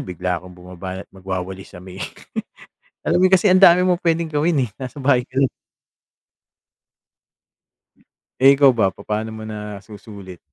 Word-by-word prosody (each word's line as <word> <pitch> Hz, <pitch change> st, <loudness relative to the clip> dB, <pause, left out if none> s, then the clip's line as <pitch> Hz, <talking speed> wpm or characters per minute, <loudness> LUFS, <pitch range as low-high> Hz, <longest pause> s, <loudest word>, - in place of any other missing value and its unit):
bigla 90 Hz, -1 st, -3 dB
akong 90 Hz, 0 st, -13 dB
bumabanat 90 Hz, +1 st, -8 dB
magwawalis 95 Hz, -1 st, -6 dB
sa -, -, -10 dB
may 95 Hz, +1 st, -11 dB, 1.0 s
Alam -, -, +1 dB
mo -, -, +7 dB
kasi 190 Hz, +2 st, +5 dB
ang 185 Hz, -, +5 dB
dami 180 Hz, -1 st, +7 dB
mo 180 Hz, -, +3 dB
puwedeng 165 Hz, -1 st, 0 dB
gawin, 150 Hz, -3 st, +1 dB
eh, -, -, -16 dB
nasa 130 Hz, +2 st, -7 dB
bahay 130 Hz, -2 st, +3 dB
ka 130 Hz, -, -22 dB
lang. 135 Hz, -, +4 dB, 2.9 s
Eh, 135 Hz, +1 st, +7 dB
ikaw 140 Hz, -2 st, +6 dB
ba 110 Hz, -5 st, +2 dB
papaano 105 Hz, +3 st, -4 dB
mo 110 Hz, -, -8 dB
nasusulit? 105 Hz, -2 st, -9 dB
105 Hz, 145 wpm, -20 LUFS, 95-140 Hz, 2.9 s, mo